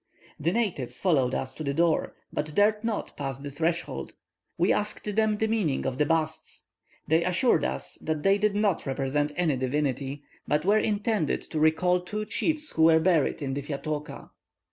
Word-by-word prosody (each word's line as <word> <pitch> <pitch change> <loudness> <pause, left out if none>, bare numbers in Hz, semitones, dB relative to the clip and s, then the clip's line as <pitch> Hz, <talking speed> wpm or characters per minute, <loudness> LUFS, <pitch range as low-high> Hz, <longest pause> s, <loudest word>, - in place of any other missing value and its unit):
The 165 - +1
natives 195 - -1
followed 135 -9 +2
us 130 0 -3
to 155 - -7
the 140 -1 -2
door, 165 -1 +1 0.2
but 150 0 -3
dared 210 +1 +3
not 225 -2 -3
pass 135 -3 -4
the 140 +1 -7
threshold. 165 +4 -2 0.4
We - - +3
asked 210 0 -3
them 220 -1 +2
the 220 - +1
meaning 205 -11 0
of 130 -1 -2
the 150 - +3
busts: 160 -1 -2 0.4
they 160 +2 +3
assured 185 +8 +2
us - - -3
that 155 -1 -2
they 195 +1 +4
did 210 -1 +1
not 205 -7 +1
represent 140 +2 0
any 160 -6 +1
divinity, 135 +1 -2 0.2
but 150 +2 +1
were 210 +2 +4
intended 210 -5 0
to 155 - -4
recall 180 +4 +3
two 210 +4 -4
chiefs 305 +7 0
who 160 - +3
were 160 0 +6
buried 160 -4 +2
in 135 -1 -2
the 140 - -2
'Fiatooka.'" 150 +1 -5
160 Hz, 180 wpm, -27 LUFS, 145-205 Hz, 0.4 s, were